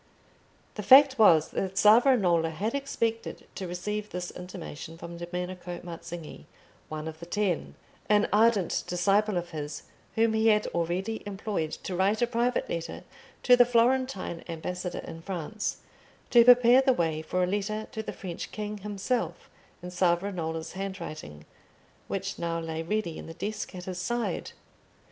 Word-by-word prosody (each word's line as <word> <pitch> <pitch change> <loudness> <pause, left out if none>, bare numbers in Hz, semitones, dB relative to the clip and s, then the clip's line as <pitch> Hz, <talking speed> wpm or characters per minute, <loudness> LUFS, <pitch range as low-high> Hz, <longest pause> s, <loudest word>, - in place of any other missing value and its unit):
The 210 - -5
fact 265 +4 +7
was 165 -8 +6
that 190 0 -3
Savonarola 210 -7 +5
had 200 +8 -3
expected 230 -5 -2
to 190 - -5
receive 210 +4 -4
this 180 0 -5
intimation 170 -3 -8
from 170 0 -8
Domenico 180 0 -5
Mazzinghi, 170 -1 -8 0.4
one 155 0 -5
of 160 0 -7
the 170 - -9
Ten, 195 -2 -1 0.3
an 210 0 +4
ardent 215 -3 +3
disciple 195 +3 +2
of 175 0 -4
his 150 -2 -5 0.3
whom 225 0 +3
he 220 0 +2
had 210 -1 +4
already 180 +6 -1
employed 195 -5 -2
to 185 - -4
write 195 +4 +2
a 240 - +4
private 240 +1 0
letter 165 0 -5 0.4
to 250 - +7
the 245 - +7
Florentine 240 -6 +1
ambassador 180 +2 -4
in 165 - -8
France, 190 +4 -4 0.5
to 240 -1 +8
prepare 245 +1 +7
the 265 -1 +4
way 160 -6 0
for 180 +3 -1
a - - +4
letter 205 +3 -2
to 220 -4 -4
the - - -5
French 180 -4 -7
king 210 -1 -5
himself 210 +4 -3 0.3
in 180 - -6
Savonarola's 170 -2 -1
handwriting, 155 - -7 0.6
which 195 +1 -4
now 170 -1 -1
lay 160 -1 -4
ready 170 -1 -2
in - - -9
the 165 - -9
desk 205 +1 -4
at 180 -1 -7
his 185 -1 -5
side. 240 +5 -2
190 Hz, 155 wpm, -28 LUFS, 170-215 Hz, 0.6 s, to